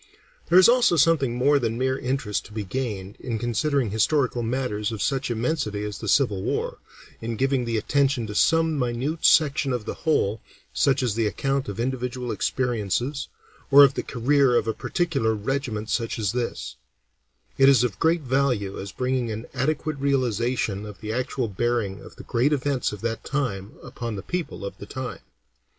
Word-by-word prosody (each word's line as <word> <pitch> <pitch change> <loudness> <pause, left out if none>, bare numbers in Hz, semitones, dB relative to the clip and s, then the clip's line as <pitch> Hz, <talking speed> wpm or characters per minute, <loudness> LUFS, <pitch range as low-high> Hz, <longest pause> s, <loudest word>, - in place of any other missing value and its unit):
There 180 - +6
is 185 - +9
also 240 -7 +4
something 145 -6 +3
more 140 +4 +3
than 115 -2 -1
mere 130 +1 +1
interest 130 -5 -2
to - - -13
be 105 -1 -3
gained, 100 -3 -4
in 120 -3 -3
considering 120 +1 0
historical 125 +3 +1
matters 115 -3 -2
of 110 - -5
such 135 +2 -1
immensity 115 -3 -1
as 105 -1 -5
the - - -6
Civil 105 -9 +2
War, - - -2 0.4
in 115 0 -3
giving 135 +1 +1
the 115 -1 -1
attention 135 +1 +1
to 105 - -6
some 160 +4 +3
minute 125 +6 -2
section 145 -3 +4
of 120 -4 -2
the - - -3
whole, 115 -10 0 0.3
such 135 -1 +2
as 120 -4 +1
the 115 0 +1
account 135 +5 -1
of 100 - -6
individual 125 0 -2
experiences, 125 +2 -1 0.4
or 140 0 +9
of 140 -1 +5
the - - -2
career 130 +1 +2
of 115 - +2
a 110 - +1
particular 135 -12 0
regiment 110 -1 -3
such 115 0 -1
as 105 -4 0
this; 120 -1 -4 0.8
it 135 0 +7
is 130 -4 +5
of 105 -5 -2
great 165 +1 +2
value 125 -7 0
as 100 0 -6
bringing 125 -2 -1
an 110 +2 -5
adequate 150 +3 -1
realization 120 -6 0
of 105 -2 -9
the 110 0 -4
actual 125 0 -1
bearing 105 -1 -1
of - - -13
the - - -11
great 125 +5 +1
events 140 -2 0
of 105 -2 -8
that 115 -1 -3
time 115 -8 -3
upon 120 -3 -5
the 95 - -6
people 175 - -4
of 100 - -6
the 100 - -9
time. 130 -1 -5
125 Hz, 180 wpm, -24 LUFS, 110-140 Hz, 0.8 s, is